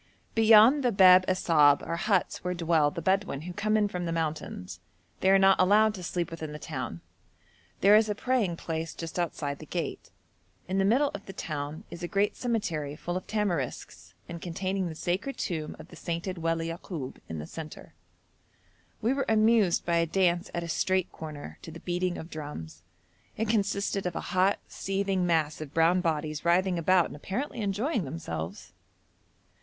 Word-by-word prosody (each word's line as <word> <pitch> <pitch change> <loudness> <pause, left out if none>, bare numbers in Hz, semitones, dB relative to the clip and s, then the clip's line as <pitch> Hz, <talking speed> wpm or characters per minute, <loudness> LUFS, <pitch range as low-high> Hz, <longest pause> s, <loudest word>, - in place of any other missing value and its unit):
Beyond 225 +5 +6
the 245 - +3
Bab 185 -2 +7
Assab 155 -6 +4
are - - -2
huts 195 +1 0
where 180 0 -2
dwell 165 -3 +2
the 165 +2 -6
Bedouin 190 -6 0
who 175 +2 -7
come 215 +2 +1
from 180 -3 -4
the - - -2
mountains. 155 - -4 0.4
They 190 - +2
are 195 - +7
not 195 0 +5
allowed 210 +3 +5
to 190 - -8
sleep 175 -1 -2
within 160 -2 -6
the - - -5
town. - - -5 0.8
There 200 +2 +7
is 215 0 +4
a 210 - 0
praying 215 -7 0
place 160 -1 -4
just 165 +1 -5
outside 145 -4 -2
the - - -10
gate. - - -4 0.6
In 190 +2 0
the 195 - +3
middle 265 +8 +3
of 200 - -8
the 195 - -7
town 150 -2 -5
is 170 - -8
a 175 - -3
great 200 +3 +1
cemetery 170 - -2
full 175 +3 -4
of 185 - -4
tamarisks, 185 - -3
and 170 -1 -7
containing 185 +1 -2
the 160 - -7
sacred 190 - -2
tomb 160 -4 -3
of - - -12
the - - -12
sainted 170 +1 -4
Wali 165 0 -1
Yakoub 165 -5 -6
in 80 - -4
the 75 - -5
centre. 155 - -9 1.1
We 235 +4 +3
were 275 0 -1
amused 220 -4 +3
by 170 -1 +2
a 165 0 +2
dance 175 0 +1
at 170 - -2
a - - -5
street 185 +3 0
corner 145 - -8
to - - -9
the 165 +1 -9
beating 180 +1 -2
of 160 - -8
drums. 145 - -7 0.6
It 220 0 -1
consisted 200 -2 0
of 175 - -4
a - - -1
hot, 185 +2 +3
seething 195 -2 -1
mass 155 -3 +1
of 150 -1 -8
brown 165 +3 +4
bodies 155 -3 -2
writhing 180 +1 +2
about 180 +1 +4
and - - -8
apparently 235 - -4
enjoying 210 - 0
themselves. 95 - -6
175 Hz, 180 wpm, -28 LUFS, 160-200 Hz, 1.1 s, Bab